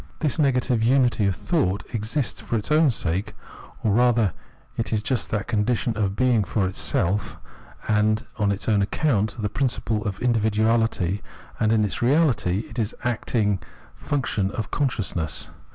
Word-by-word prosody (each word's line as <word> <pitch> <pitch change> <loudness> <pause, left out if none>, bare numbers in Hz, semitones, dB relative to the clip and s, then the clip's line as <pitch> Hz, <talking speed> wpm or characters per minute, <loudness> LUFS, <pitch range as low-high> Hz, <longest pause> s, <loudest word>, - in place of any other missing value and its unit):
This 155 0 -1
negative 125 -4 +2
unity 120 -3 +3
of 95 - 0
thought 110 - 0
exists 115 +4 -2
for - - -3
its 110 +6 -3
own 155 0 +5
sake, 95 -5 -1 0.5
or 110 - +2
rather 115 -3 +3 0.4
it 115 - -3
is 105 -2 0
just 125 -2 -1
that 105 -2 -1
condition 115 +1 0
of 100 -2 -1
being 125 -3 +3
for 100 +1 0
itself 95 +1 -1 0.5
and 110 0 +2
on 105 -2 +2
its 100 0 -3
own 105 -3 +3
account, 110 -1 0
the 105 - 0
principle 115 -2 -1
of 100 -3 -2
individuahty, 110 -4 +1 0.4
and 110 -1 +2
in 110 -1 +3
its 100 - -4
reality 120 - +2
it 115 - -7
is 110 0 -1
an - - -18
acting 105 -4 0 0.4
function 120 -9 -1
of 110 -2 -5
consciousness. 110 - -1
110 Hz, 155 wpm, -24 LUFS, 105-125 Hz, 0.5 s, own